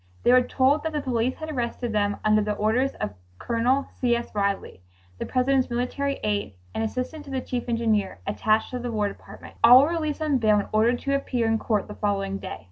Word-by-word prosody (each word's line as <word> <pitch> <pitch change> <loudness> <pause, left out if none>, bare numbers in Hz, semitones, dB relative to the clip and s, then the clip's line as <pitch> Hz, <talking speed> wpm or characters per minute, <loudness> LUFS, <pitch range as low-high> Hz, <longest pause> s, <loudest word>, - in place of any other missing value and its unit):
They - - +5
were 255 - +7
told 265 +4 +2
that 320 0 -3
the 300 - -1
police 250 -1 0
had 315 0 -6
arrested 240 -2 -3
them 205 -1 +1
under 215 0 +4
the 210 0 -1
orders 235 +6 +1
of 105 - -3 0.3
Col. 245 - +1 0.2
C. 240 -2 +2
S. 235 0 -5
Ridley, 200 - -2 0.4
the - - -4
President's 260 0 +1
military 260 +3 -2
aide, 205 - -1 0.2
and - - -2
assistant 255 +7 -4
to - - -11
the 265 -1 -2
Chief 250 -1 -4
Engineer 220 -4 0
attached 215 +1 +1
to 250 - -3
the 245 0 -4
War 210 -2 0
Department. - - -13
All 250 +3 +9
were 295 - +1
released 315 -2 -2
on 290 -4 +1
bail 215 -2 +4
and 205 - -2
ordered 225 +3 +3
to 275 - -1
appear 255 -4 0
in 225 0 +1
court 215 -3 -1
the 210 - -7
following 195 -2 -2
day. 190 - -7
235 Hz, 215 wpm, -25 LUFS, 215-265 Hz, 0.4 s, All